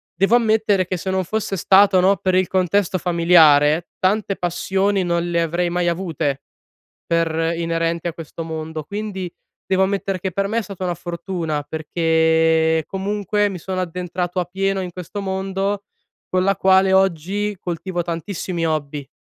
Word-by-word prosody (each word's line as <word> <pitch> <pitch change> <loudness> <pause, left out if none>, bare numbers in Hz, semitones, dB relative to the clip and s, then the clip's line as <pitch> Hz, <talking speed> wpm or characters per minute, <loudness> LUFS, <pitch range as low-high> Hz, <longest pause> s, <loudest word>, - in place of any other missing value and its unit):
Devo 195 +6 +3
ammettere 220 -4 +2
che 185 - -3
se 190 - -5
non 190 0 0
fosse 215 +1 -2
stato, 195 +1 +5
no, 195 +2 +4
per 185 +1 0
il 185 -1 +3
contesto 185 +1 +1
familiare 165 -3 +4
tante 195 +1 +1
passioni 190 +3 0
non 170 0 -1
le 170 -1 +1
avrei 170 +2 0
mai 175 0 0
avute 160 -6 -2 0.6
per 165 0 +1
inerenti 165 0 -1
a - - -3
questo 165 0 -7
mondo. 160 -1 -5
Quindi, 200 -1 -5 0.4
devo 190 0 +2
ammettere 195 -1 -2
che 190 +1 -3
per 195 +3 0
me 220 +3 -1
è - - 0
stata 195 -3 -7
una 175 -1 -1
fortuna, 170 -3 -4
perché 160 0 +2
comunque 205 +2 -1
mi 185 - -6
sono 185 +2 -4
addentrato 180 +1 -4
appieno 195 +2 -1
in 180 -1 -4
questo 180 +4 -6
mondo, 195 +1 -2 0.5
con 185 - +3
la 195 -1 +2
quale 190 0 +4
oggi 195 +2 +1
coltivo 175 0 -3
tantissimi 170 0 -3
hobby. 145 -3 -3
180 Hz, 155 wpm, -20 LUFS, 165-195 Hz, 0.6 s, stato